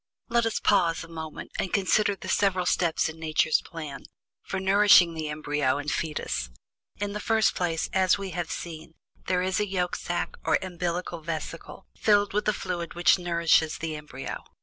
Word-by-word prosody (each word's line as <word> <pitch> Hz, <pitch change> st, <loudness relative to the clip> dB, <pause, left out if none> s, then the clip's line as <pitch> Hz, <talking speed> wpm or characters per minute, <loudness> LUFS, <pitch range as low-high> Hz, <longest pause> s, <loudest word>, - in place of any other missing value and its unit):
Let 235 Hz, -1 st, +2 dB
us 225 Hz, -, -1 dB
pause 175 Hz, -5 st, +2 dB
a -, -, -10 dB
moment, 160 Hz, -2 st, -7 dB
and -, -, 0 dB
reconsider 200 Hz, +2 st, +2 dB
the 185 Hz, -, -10 dB
several 185 Hz, -1 st, +2 dB
steps 170 Hz, -2 st, +1 dB
in 160 Hz, 0 st, -8 dB
Nature's 155 Hz, -1 st, +2 dB
plan 155 Hz, -4 st, -8 dB, 0.4 s
for 190 Hz, -, -4 dB
nourishing 190 Hz, -3 st, +6 dB
the 160 Hz, -2 st, -4 dB
embryo 145 Hz, -2 st, 0 dB
and 145 Hz, 0 st, -3 dB
fetus. 145 Hz, -, -2 dB, 0.5 s
In 205 Hz, 0 st, -3 dB
the 210 Hz, -, -3 dB
first 220 Hz, 0 st, +2 dB
place, 165 Hz, -3 st, -1 dB
as 190 Hz, 0 st, +3 dB
we 195 Hz, -2 st, -5 dB
have 175 Hz, -1 st, -3 dB
seen, 160 Hz, -1 st, -7 dB, 0.3 s
there 180 Hz, -1 st, +1 dB
is 185 Hz, 0 st, 0 dB
the 210 Hz, -, 0 dB
yolk 180 Hz, -2 st, -1 dB
sack 175 Hz, -, -3 dB
or -, -, +3 dB
umbillical 175 Hz, -1 st, -3 dB
vesicle, 165 Hz, +3 st, -6 dB
filled 205 Hz, -2 st, +3 dB
with 210 Hz, +1 st, 0 dB
a 215 Hz, -, +3 dB
fluid 175 Hz, -4 st, -4 dB
which 175 Hz, +2 st, +4 dB
nourishes 170 Hz, -2 st, +2 dB
the 160 Hz, -1 st, -4 dB
embryo. 150 Hz, -3 st, -7 dB
175 Hz, 175 wpm, -27 LUFS, 160-190 Hz, 0.5 s, nourishing